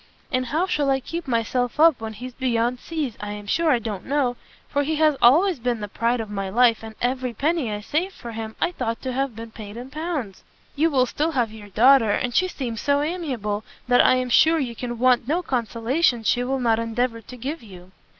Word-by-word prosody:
And 255 -2 0
how 320 +5 0
I - - -1
shall 275 -6 +1
keep 335 +3 -6
myself 245 +2 -1
up 315 -6 +5
when 220 0 -5
he's 250 +4 -8
beyond 245 -1 0
seas, 300 -8 -4
I 205 0 -5
am 205 0 -8
sure 325 +10 +1
I 250 - +4
don't 215 -5 -5
know, 275 -3 +1 0.3
for 285 - 0
he 310 +2 -1
has 305 -1 +3
always 320 +7 +5
been 240 -1 -1
the 210 - -4
pride 235 +4 0
of 225 - -4
my 195 -1 -3
life, 230 +2 +4
and 220 -1 -9
every 250 -1 -1
penny 295 -3 0
I 210 0 -4
saved 345 - -2
for 235 - -8
him, 220 -1 -6
I 350 - +1
thought 230 -8 -3
to 260 -1 -3
have 270 -2 -1
been 225 0 -8
paid 215 -1 -9
in 250 +2 -8
pounds." 300 - -4 0.3
"You 315 +3 +3
will 260 -4 +3
still 310 +5 -1
have 240 -5 0
your 210 -2 -11
daughter, 235 +3 +5
and 245 +4 0
she 370 - +3
seems 240 - -5
so 285 0 +2
amiable, 255 - -3 0.2
that 245 0 +5
I - - +5
am 255 -1 -1
sure 320 +6 +5
you 260 -6 -2
can 240 0 -5
want 245 -1 +3
no 340 +5 0
consolation 240 0 0
she 245 +3 +2
will 265 +2 -1
not 230 -2 +2
endeavour 230 +1 -1
to 250 +3 -11
give 280 +7 -5
you." 185 -4 -13
250 Hz, 230 wpm, -23 LUFS, 225-285 Hz, 0.3 s, up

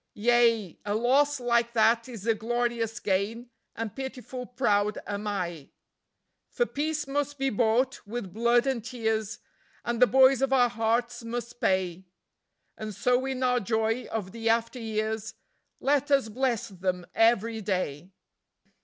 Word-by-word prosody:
Yea, 230 -4 +2
a 205 0 -1
loss 270 +5 +3
like 235 -1 +1
that 230 +2 +3
is 225 -5 -8
a 230 - +4
glorious 235 0 -1
gain, 220 +4 -1 0.2
and 225 -2 -5
pitiful 255 -1 -6
proud 210 -4 +1
am 205 +1 -4
I. 175 -7 -3 0.8
For 485 - 0
Peace 305 -4 -2
must 285 +1 -2
be 270 0 0
bought 235 +3 +1
with 215 -4 -5
blood 235 +3 +3
and 260 -5 -1
tears, 220 -3 -2 0.5
and 235 0 -2
the 250 - +8
boys 265 +1 +5
of 270 0 +1
our 250 -2 +4
hearts 235 +1 -1
must 235 +1 -6
pay; 185 -1 0 0.7
And 215 -2 -6
so 250 +5 +1
in 260 -1 -2
our 250 -1 +3
joy 225 +3 0
of 205 -4 -4
the 230 +1 -2
after 230 +2 +1
years, 220 -1 -3 0.4
let 285 0 +1
us 275 -5 +3
bless 245 0 -1
them 180 -2 -3
every 225 0 +2
day. 180 -5 -2
230 Hz, 145 wpm, -27 LUFS, 215-250 Hz, 0.8 s, the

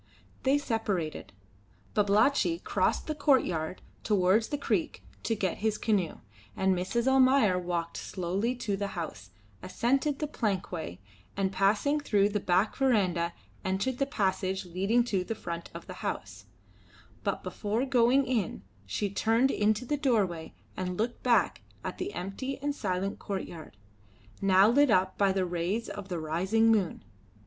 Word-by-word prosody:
They 270 +2 +3
separated. 215 - -2 0.6
Babalatchi 220 +11 +3
crossed - - 0
the 310 - -2
courtyard 250 - +1 0.2
towards 205 +1 +3
the 290 - -2
creek 280 - -1 0.2
to 225 - 0
get 190 -4 -1
his 215 0 0
canoe, 200 -7 0 0.4
and 190 0 +2
Mrs. 190 +7 -1
Almayer 260 -7 +5
walked 170 -1 -3
slowly 195 +7 -2
to 210 -5 -2
the 200 -1 -4
house, 105 - -5 0.3
ascended 270 +9 0
the 300 - -2
plankway, 185 - -3 0.4
and 195 -1 +1
passing 205 +10 +2
through 205 -8 +2
the 210 0 -1
back 185 +2 +1
verandah 185 -10 +2 0.3
entered 200 +7 -1
the 275 - +1
passage 190 -5 -1
leading 195 +7 +1
to 200 -6 -1
the 225 - -4
front 170 -4 -6
of - - -9
the - - -8
house; - - -5 0.8
but - - -2
before 220 +5 -2
going 260 +1 +4
in 230 - -1 0.2
she 150 - -1
turned 225 +6 +2
in 210 +1 +3
the 250 +7 -3
doorway 205 - 0 0.2
and 180 -1 -3
looked 235 +3 -2
back 245 -2 +2 0.2
at - - -5
the 385 +3 -3
empty 230 +9 -4
and 285 +1 -2
silent 195 -5 -2
courtyard, 170 - -6 0.6
now 195 0 +6
lit 280 +5 +4
up 185 -2 +3
by 200 -1 +4
the 190 -1 0
rays 180 +6 -2
of 205 -2 -7
the 175 -2 -2
rising 190 +9 +2
moon. 200 -6 +1
205 Hz, 150 wpm, -29 LUFS, 185-245 Hz, 0.8 s, now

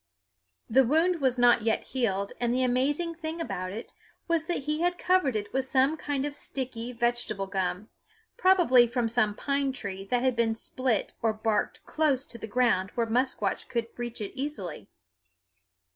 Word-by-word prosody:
The 265 +4 +5
wound 325 +6 +2
was 260 -2 +2
not 245 -1 +5
yet 225 0 0
healed, 200 -6 -1
and 240 -1 +1
the 255 +1 +1
amazing 280 +7 +1
thing 325 0 -5
about 185 - -3
it 220 +4 -8 0.3
was 335 -2 +1
that 345 -4 -2
he 300 +3 -1
had 355 0 +1
covered 360 -10 +2
it 205 -1 -3
with 265 0 0
some 265 +3 +3
kind 290 -3 -2
of 290 - -3
sticky 250 -4 -4
vegetable 240 -4 -1
gum, 190 +1 -2 0.5
probably 335 -11 +5
from 240 0 0
some 220 -2 +1
pine 275 +1 0
tree 200 -7 -5
that 245 +4 0
had 260 -2 +2
been 225 -1 +1
split 245 -1 -1
or 225 -1 +2
barked 215 -1 -1
close 285 -4 +1
to 235 - -8
the 220 - -6
ground 225 -5 +2
where 235 - +1
Musquash 250 +4 0
could 235 -2 -2
reach 240 -1 -5
it 205 - -5
easily. 200 - -5
245 Hz, 175 wpm, -28 LUFS, 225-280 Hz, 0.5 s, The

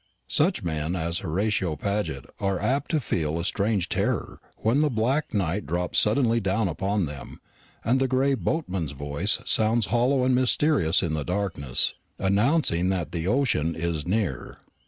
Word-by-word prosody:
Such - - +2
men 80 0 -2
as 85 0 -2
Horatio 95 -1 -1
Paget 100 -9 -2
are 95 -2 0
apt 130 +9 0
to 160 - +1
feel 80 - -1
a - - -2
strange 100 0 0
terror - - -2 0.2
when 115 +6 +1
the 150 0 +3
black 130 +5 0
night 95 -3 -1
drops 85 +3 0
suddenly 115 +1 +3
down 100 +1 0
upon 95 +3 -1
them, 70 -2 -8 0.5
and 125 +4 +3
the 135 - +2
"Gray 130 +2 +2
Boatman's" 95 - -2
voice 70 +9 0
sounds 110 0 +3
hollow 125 +2 +3
and 130 0 +3
mysterious 125 - +3
in 80 -3 -1
the 75 -2 -1
darkness, 90 -8 -1 0.2
announcing 100 - +2
that 90 -5 -2
the 85 0 -3
ocean 105 - +1
is 80 -2 -2
near. 90 - -2
100 Hz, 155 wpm, -25 LUFS, 85-120 Hz, 0.5 s, the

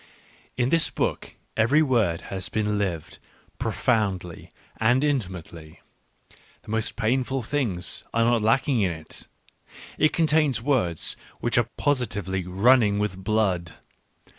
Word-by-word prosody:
— - - -31
In 125 - +1
this 165 +1 +3
book - - -3 0.2
every 140 +8 +4
word 110 - +1
has 95 -1 -3
been 105 -1 0
lived, 90 -6 -3 0.4
profoundly 95 -8 -1 0.3
and 120 +5 +3
intimately; 90 - -3 0.8
the - - -9
most 110 0 -1
painful 125 +3 0
things 110 - -2
are 115 - +2
not 120 -1 +3
lacking 125 +3 +2
in 95 - +2
it; 80 -2 -8 0.7
it 155 - +4
contains 155 -5 +2
words 115 - +1 0.2
which - - +2
are - - 0
positively 100 - -1
running 105 +2 +4
with 100 -2 -2
blood. 95 -5 0
110 Hz, 125 wpm, -25 LUFS, 95-130 Hz, 0.8 s, every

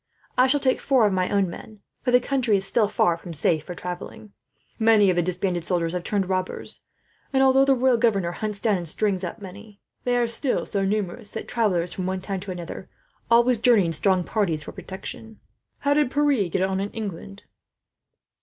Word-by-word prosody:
"I 255 - +5
shall 290 +2 +2
take 260 -2 +1
four 260 -5 +3
of 205 - +2
my 185 -1 0
own 200 -2 +2
men, 210 +4 -10 0.2
for 255 - -2
the 250 0 +6
country 250 -5 +1
is 195 - 0
still 220 -3 +3
far 175 -4 +1
from 170 0 -9
safe 155 0 +1
for 180 - -7
travelling. 180 +4 -7 0.5
Many 220 -3 +5
of - - -1
the 175 - +2
disbanded 180 0 -2
soldiers 170 -1 -1
have 180 -1 -3
turned 200 -1 -1
robbers 185 -1 -3 0.5
and, 265 -1 +3
although 270 0 +5
the 275 -1 +4
royal 255 -1 +3
governors 195 -7 +1
hunt 210 -2 -3
down 215 -4 +3
and 170 -3 0
string 195 +1 0
up 180 - -5
many, 200 +2 -11 0.2
they 245 0 +1
are 240 - +2
still 235 +3 -1
so 200 -2 -1
numerous 205 +2 -2
that 220 - -6
travellers 185 -7 0
from 185 -1 -4
one 190 0 -2
town 190 +1 -4
to 195 +2 -9
another 175 +1 -7 0.4
always 235 0 +4
journey 225 -5 +4
in 165 - -2
strong 185 +3 +2
parties, 170 -7 -1
for - - -8
protection. 215 +3 -8 0.4
"How 285 0 +2
did 295 -3 +2
Pierre 280 -9 +1
get 185 - 0
on, 190 0 0
in 200 +1 -2
England?" 200 -2 -7
200 Hz, 205 wpm, -24 LUFS, 180-235 Hz, 0.5 s, the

